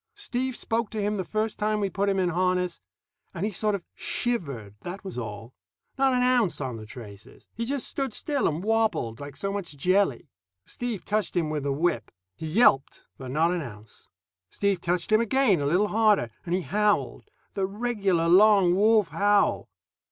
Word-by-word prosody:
Steve 260 Hz, -11 st, -3 dB
spoke 225 Hz, -1 st, -1 dB
to 220 Hz, -, -5 dB
him 205 Hz, +1 st, 0 dB
the 190 Hz, -, -2 dB
first 215 Hz, +3 st, -2 dB
time 215 Hz, 0 st, +1 dB
we 200 Hz, -, +1 dB
put 200 Hz, +1 st, -1 dB
him 195 Hz, -, +1 dB
in 185 Hz, -2 st, +2 dB
harness, 180 Hz, -, 0 dB, 0.5 s
and 180 Hz, -, -2 dB
he 215 Hz, -, -1 dB
sort 210 Hz, +2 st, 0 dB
of 190 Hz, -, -6 dB
shivered, 140 Hz, -, -3 dB
that 180 Hz, +3 st, -7 dB
was 190 Hz, -, -6 dB
all. 115 Hz, 0 st, -6 dB, 0.4 s
Not 270 Hz, 0 st, +3 dB
an 250 Hz, 0 st, +2 dB
ounce 250 Hz, -7 st, +2 dB
on 130 Hz, -4 st, -3 dB
the 110 Hz, -1 st, -10 dB
traces. 105 Hz, -4 st, -12 dB
He 230 Hz, -, -3 dB
just 275 Hz, +1 st, -1 dB
stood 270 Hz, -3 st, -2 dB
still 285 Hz, +5 st, -1 dB
and 160 Hz, +3 st, -2 dB
wobbled, 215 Hz, -, 0 dB
like 145 Hz, -1 st, -8 dB
so 195 Hz, +7 st, -3 dB
much 185 Hz, -7 st, -5 dB
jelly. 185 Hz, +2 st, +1 dB, 0.4 s
Steve 240 Hz, -5 st, -5 dB
touched 210 Hz, -3 st, -1 dB
him 160 Hz, -3 st, 0 dB
with 150 Hz, -1 st, -2 dB
the 140 Hz, 0 st, -1 dB
whip. 135 Hz, -6 st, 0 dB, 0.3 s
He 160 Hz, -, -6 dB
yelped, 155 Hz, -, +3 dB
but 130 Hz, -1 st, -7 dB
not 160 Hz, +6 st, +2 dB
an 180 Hz, -1 st, -1 dB
ounce. 105 Hz, -5 st, -11 dB, 0.4 s
Steve 200 Hz, -3 st, 0 dB
touched 175 Hz, +3 st, -1 dB
him 215 Hz, +1 st, +5 dB
again, 235 Hz, -, +2 dB
a 140 Hz, -, 0 dB
bit 190 Hz, +7 st, +2 dB
harder, 210 Hz, -, +3 dB, 0.2 s
and 170 Hz, -, +1 dB
he 185 Hz, -, 0 dB
howled 210 Hz, +3 st, 0 dB, 0.2 s
the 195 Hz, -2 st, -1 dB
regular 200 Hz, -5 st, 0 dB
long 195 Hz, 0 st, +6 dB
wolf 210 Hz, 0 st, +4 dB
howl. 205 Hz, +6 st, +2 dB
195 Hz, 190 wpm, -26 LUFS, 160-215 Hz, 0.5 s, long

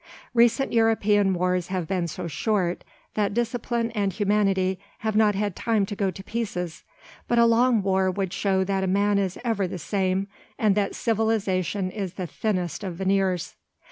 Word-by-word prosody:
Recent 235 Hz, +2 st, +3 dB
European 210 Hz, -4 st, +3 dB
wars 180 Hz, 0 st, 0 dB
have 185 Hz, -2 st, -2 dB
been 180 Hz, -2 st, -1 dB
so 170 Hz, -, -5 dB
short 180 Hz, +1 st, -1 dB, 0.3 s
that 205 Hz, -1 st, 0 dB
discipline 235 Hz, 0 st, -1 dB
and 205 Hz, -3 st, 0 dB
humanity 195 Hz, -2 st, +1 dB, 0.3 s
have 220 Hz, -1 st, 0 dB
not 215 Hz, -2 st, +4 dB
had 205 Hz, -2 st, -1 dB
time 220 Hz, -4 st, +1 dB
to 205 Hz, -, -6 dB
go 195 Hz, -1 st, 0 dB
to 190 Hz, +1 st, -8 dB
pieces, 195 Hz, -7 st, -4 dB, 0.5 s
but 240 Hz, -, +1 dB
a 235 Hz, -, +6 dB
long 230 Hz, -1 st, +4 dB
war 190 Hz, -1 st, +2 dB
would 190 Hz, 0 st, -2 dB
show 190 Hz, -1 st, +1 dB
that 190 Hz, 0 st, 0 dB
man 200 Hz, +1 st, +2 dB
is 190 Hz, -2 st, -1 dB
ever 220 Hz, -5 st, +1 dB
the 180 Hz, -, -5 dB
same, 190 Hz, +3 st, -1 dB, 0.3 s
and 215 Hz, -3 st, +3 dB
that 200 Hz, 0 st, 0 dB
civilization 205 Hz, -4 st, 0 dB
is 190 Hz, -3 st, -4 dB
the 185 Hz, -, -3 dB
thinnest 180 Hz, -1 st, -2 dB
of 185 Hz, -3 st, -4 dB
veneers. 190 Hz, -1 st, 0 dB
200 Hz, 170 wpm, -25 LUFS, 185-220 Hz, 0.5 s, a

